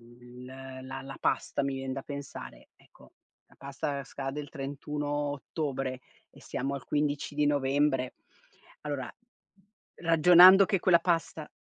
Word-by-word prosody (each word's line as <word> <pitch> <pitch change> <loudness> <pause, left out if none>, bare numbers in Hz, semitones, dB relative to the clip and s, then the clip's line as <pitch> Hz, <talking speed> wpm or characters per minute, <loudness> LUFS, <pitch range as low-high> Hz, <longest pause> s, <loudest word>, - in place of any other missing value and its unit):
il 120 +1 -14
la 130 0 -8
la 135 0 -9
pasta 140 - 0
mi 135 0 -1
vien 135 0 -4
da 135 - -5
pensare. 140 0 -9
Ecco, - - -21 0.4
la - - -23
pasta 140 0 -4
scade 135 +2 -5
il 145 - -9
31 145 +1 -5 0.3
ottobre 135 -3 -4 0.3
e - - -18
siamo 140 +2 -3
al 135 - -7
15 145 0 -1
di 150 0 +1
novembre, 140 -2 +1 0.7
allora, 145 -4 -5 0.9
ragionando 175 +3 +8
che 195 - +1
quella 175 -2 +5
pasta 165 -3 -1
140 Hz, 135 wpm, -29 LUFS, 135-150 Hz, 0.9 s, ragionando